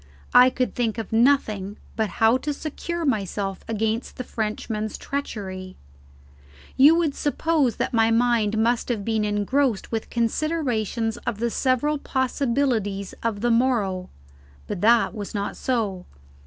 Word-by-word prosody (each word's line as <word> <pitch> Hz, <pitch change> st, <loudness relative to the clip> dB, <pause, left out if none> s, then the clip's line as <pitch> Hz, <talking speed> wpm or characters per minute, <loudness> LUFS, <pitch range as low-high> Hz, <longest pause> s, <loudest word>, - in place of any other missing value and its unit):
I 250 Hz, +1 st, +8 dB
could 255 Hz, 0 st, -2 dB
think 230 Hz, -2 st, -1 dB
of 225 Hz, -1 st, -5 dB
nothing 220 Hz, -5 st, +2 dB, 0.2 s
but 220 Hz, -2 st, 0 dB
how 225 Hz, +2 st, +5 dB
to 295 Hz, +2 st, -3 dB
secure 335 Hz, +3 st, -4 dB
myself 200 Hz, -, -2 dB
against 225 Hz, +1 st, -2 dB
the 255 Hz, -, -3 dB
Frenchman's 215 Hz, -1 st, -3 dB
treachery. 190 Hz, -9 st, -5 dB, 1.0 s
You 290 Hz, +5 st, +7 dB
would 330 Hz, -4 st, +1 dB
suppose 295 Hz, -3 st, +1 dB
that -, -, -2 dB
my 225 Hz, -1 st, +4 dB
mind 230 Hz, -2 st, +2 dB
must 230 Hz, +3 st, +1 dB
have 215 Hz, -5 st, -2 dB
been 220 Hz, -1 st, 0 dB
engrossed 210 Hz, +3 st, 0 dB
with 225 Hz, -1 st, -3 dB
considerations 235 Hz, -, -1 dB
of 235 Hz, -3 st, -4 dB
the 235 Hz, +1 st, -1 dB
several 275 Hz, +5 st, +1 dB
possibilities 245 Hz, -7 st, -1 dB
of 220 Hz, -3 st, -2 dB
the 240 Hz, 0 st, +2 dB
morrow; 220 Hz, -7 st, +1 dB, 0.6 s
but 175 Hz, -, -5 dB
that 230 Hz, +1 st, +4 dB
was 210 Hz, 0 st, -6 dB
not 200 Hz, 0 st, -2 dB
so. 210 Hz, -8 st, -2 dB
230 Hz, 140 wpm, -24 LUFS, 210-260 Hz, 1.0 s, I